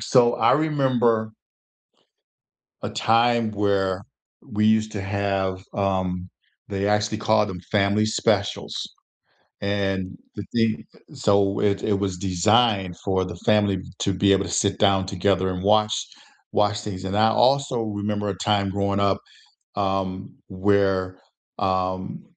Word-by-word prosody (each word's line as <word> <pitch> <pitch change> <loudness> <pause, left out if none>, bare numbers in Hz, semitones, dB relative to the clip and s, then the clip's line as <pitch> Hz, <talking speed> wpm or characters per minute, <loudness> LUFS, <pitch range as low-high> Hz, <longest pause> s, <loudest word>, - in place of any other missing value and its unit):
so 120 -2 +4
I - - +3
remember 125 -7 +1 1.5
a - - -3
time 115 0 +2
where 100 -2 0 0.4
we 105 0 0
used 110 0 +2
to 105 - -4
have 95 -1 -2
um, 95 -2 -1 0.4
they 100 -1 -2
actually 105 +1 +1
called 110 -1 +2
them 95 -2 -6
family 105 +1 +2
specials. 110 -2 0 0.9
And 95 -2 -2 0.2
the 105 - -6
thing 115 -2 +1 0.3
so 100 -1 +2
it 100 -1 +1
it 100 -2 +1
was 95 -3 -2
designed 95 +1 +2
for 95 -1 +1
the 90 -1 -7
family 105 -2 +3 0.2
to 100 - +1
be 100 +1 +3
able 100 0 +2
to 90 - -6
sit 100 +1 0
down 100 -2 +3
together 95 0 0
and 90 0 -4
watch 105 +2 +3 0.6
watch 105 0 +1
things, 95 -3 -6
and 95 +1 -2
I 110 +1 +5
also 130 +2 +2
remember 105 -1 -3
a 100 - -2
time 100 0 0
growing 100 0 -1
up, 100 -1 +2 0.6
um, 95 -1 -2
where, 95 -1 +1 0.4
um, 95 0 -2
100 Hz, 135 wpm, -23 LUFS, 95-105 Hz, 1.5 s, I